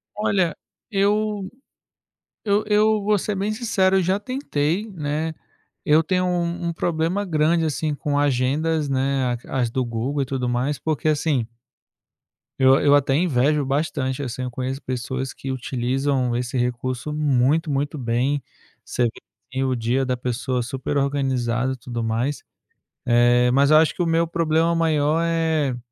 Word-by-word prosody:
Olha, 190 -6 +1 0.4
eu 205 0 +1 0.9
eu 205 0 +2
eu 210 0 +3
vou 210 0 +3
ser 205 +2 -2
bem 200 +3 -1
sincero, 195 -4 +2
eu 185 - +2
já 190 +3 +1
tentei, 205 - -2
né. 155 -1 -3 0.5
Eu 155 +2 +4
tenho 185 +1 0
um 175 -1 -1
um - - -3
problema 170 +5 -1
grande, 165 -1 +2
assim, 155 0 -1
com 145 0 -2
agendas, 145 +3 +1
né, 135 -2 0
a 135 - -2
as 120 - +1
do 130 +2 -1
Google 120 +5 -2
e - - -5
tudo 130 -2 -2
mais, 130 +4 -1
porque 155 -1 -2
assim 145 -6 +1 1.1
eu 130 +1 +6
eu 145 0 +6
até 135 -1 +2
invejo 150 -2 +2
bastante, 135 -1 -1
assim. 130 0 -5
Eu 125 - -3
conheço 130 +3 -4
pessoas 130 +1 -4
que 135 - -6
utilizam 130 0 -1
esse 125 +1 -2
recurso 125 +3 -2
muito, 150 +2 +2
muito 145 +2 -1
bem. 125 +4 0 0.4
Você - - -1
vê, 115 - +2 0.4
assim, 130 +1 0
o 130 -1 0
dia 120 +3 0
da 125 -1 -1
pessoa 125 0 -2
super 135 +3 -3
organizado 130 -3 0
e - - -8
tudo 120 -1 -5
mais. 115 +6 -1 0.6
Eh, 120 +1 +4
mas 140 +2 +4
eu 155 - +7
acho 160 0 +4
que 180 - -1
o - - 0
meu 165 0 +2
problema 165 0 +1
maior 160 -1 +2
é 160 -5 0
145 Hz, 160 wpm, -22 LUFS, 130-165 Hz, 1.1 s, eu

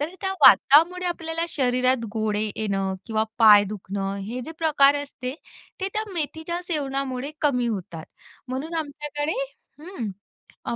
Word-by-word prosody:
तर 320 +5 -3
त्या 385 -1 -1
वातामुळे 345 +6 +6
आपल्याला 330 -1 -2
शरीरात 255 -4 +1
गोळे 215 -2 -1 0.2
येणं 195 -3 -1
किंवा 220 -1 0
पाय 210 -3 +8
दुखणं 195 -1 -4
हे 245 +3 -4
जे 320 - -7
प्रकार 290 -4 +4
असते, 260 -2 -6 0.5
ते 380 - -1
त्या 430 - -1
मेथीच्या 320 +2 -3
सेवनामुळे 275 -3 -2
कमी 250 -5 +1
होतात. 180 -7 -4 0.4
म्हणून 275 +6 -4
आमच्याकडे 295 -1 -3 0.5
हं, 315 - -5 0.6
अ, - - -2
275 Hz, 135 wpm, -24 LUFS, 220-320 Hz, 0.6 s, पाय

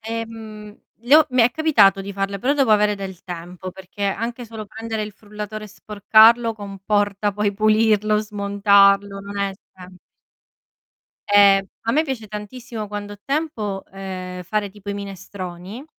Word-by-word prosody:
ehm, 220 -2 -7 0.3
le 245 +5 +4
ho 315 - +5
mi 250 -1 +4
è 235 - +4
capitato 225 -12 +4
di 195 0 -7
farle 195 0 -2
però 260 +8 +1
devo 275 -5 +2
avere 210 0 +3
del 190 -2 -8
tempo, 180 +1 -7
perché 190 +2 -10
anche 230 +4 -3
solo 220 -1 -8
prendere 220 +1 -5
il 210 - -6
frullatore 210 +1 -8
e - - -8
sporcarlo 220 +3 +4
comporta 205 0 -1
poi 205 0 0
pulirlo, 215 0 +3
smontarlo, 200 -1 +3
non 200 +1 -8
è 200 -1 -1 0.2
sem 185 0 -13 1.3
Ehm, 200 -1 +6 0.2
a 230 - 0
me 310 +4 +2
piace 260 -7 -5
tantissimo 215 +1 -7
quando 205 0 -6
ho 205 - -10
tempo, 235 -10 -3
ehm, 185 -2 -6
fare 205 +2 -2
tipo 205 0 -13
i 200 - -2
minestroni 195 +2 -8
205 Hz, 155 wpm, -21 LUFS, 195-220 Hz, 1.3 s, Ehm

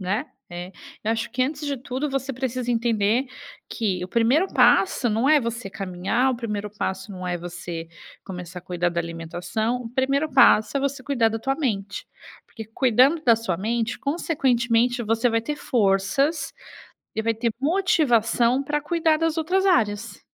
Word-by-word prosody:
né, 190 +2 -1 0.3
é 175 +2 -7 0.3
eu 220 - +1
acho 230 0 -3
que 255 +2 0
antes 295 +2 -3
de 280 - -1
tudo, 260 +4 -3
você 270 0 -2
precisa 255 -1 -3
entender 230 +1 +1 0.4
que 190 -6 -2
o - - -9
primeiro 240 - +3
passo 270 -9 +3
não 225 +6 +1
é 305 -1 +6
você 235 -3 -4
caminhar, 195 +8 -1
o 245 - -4
primeiro 210 -3 -4
passo 195 -1 -4
não 185 -1 -7
é 175 -1 -1
você 170 -1 -7 0.4
começar 180 -2 -7
a - - -30
cuidar 175 -1 -1
da 170 0 -1
alimentação. 170 +7 -3
O - - -5
primeiro 275 +4 0
passo 250 -2 +5
é 275 - +1
você 275 -1 -2
cuidar 245 -5 +1
da 225 - -3
tua 270 +4 -1
mente, 205 -9 -3 0.4
porque 220 - -9
cuidando 255 +7 +3
da 230 - +6
sua 220 -7 -2
mente, 225 +3 -2
consequentemente, 245 -6 +1
você 225 +2 +1
vai 230 - +1
ter 295 +6 -4
forças 255 - +1 0.6
e 220 - 0
vai 225 +1 +1
ter 230 +1 -1
motivação 275 - +2
para 295 +1 -1
cuidar 325 -1 +1
das 325 0 0
outras 365 +5 +1
áreas. 215 - +1
235 Hz, 170 wpm, -24 LUFS, 205-275 Hz, 0.6 s, é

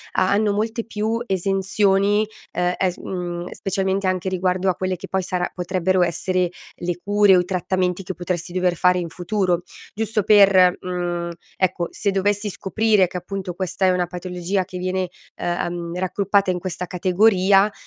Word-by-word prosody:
ha 185 - +2
hanno 210 +1 +2
molte 220 +3 -1
più 225 +1 -2
esenzioni, 195 +1 +2 0.3
ehm, 180 0 0
è 190 - +2
s 180 - -8
mhmm, 175 -1 -5
specialmente 195 0 -1
anche 185 0 -1
riguardo 185 0 0
a 180 - +1
quelle 185 +1 -2
che - - -8
poi 190 - 0
sarà 180 0 -2
potrebbero 185 0 +1
essere 180 +1 0 0.3
le 175 0 -3
cure 205 -1 +5
o - - +5
i 180 - 0
trattamenti 180 0 -1
che 190 - -4
potresti 175 0 -3
dover 180 -1 +1
fare 180 +1 +3
in 170 - -4
futuro. 180 -1 0 0.3
Giusto 220 -1 -1
per 195 -3 +6
mhmm, 175 -1 -3 0.3
ecco 180 -2 0
se 205 - -1
dovessi 205 +2 0
scoprire 210 0 +2
che 180 - -6
appunto 185 0 -5
questa 185 +1 -1
è - - +5
una 180 -1 0
patologia 180 +2 -2
che 185 0 -8
viene, 185 0 -1 0.3
ehm, 175 0 -3
raggruppata 195 +1 +1
in 180 - -2
questa 180 0 -4
categoria, 195 +2 +3
185 Hz, 170 wpm, -22 LUFS, 180-195 Hz, 0.3 s, per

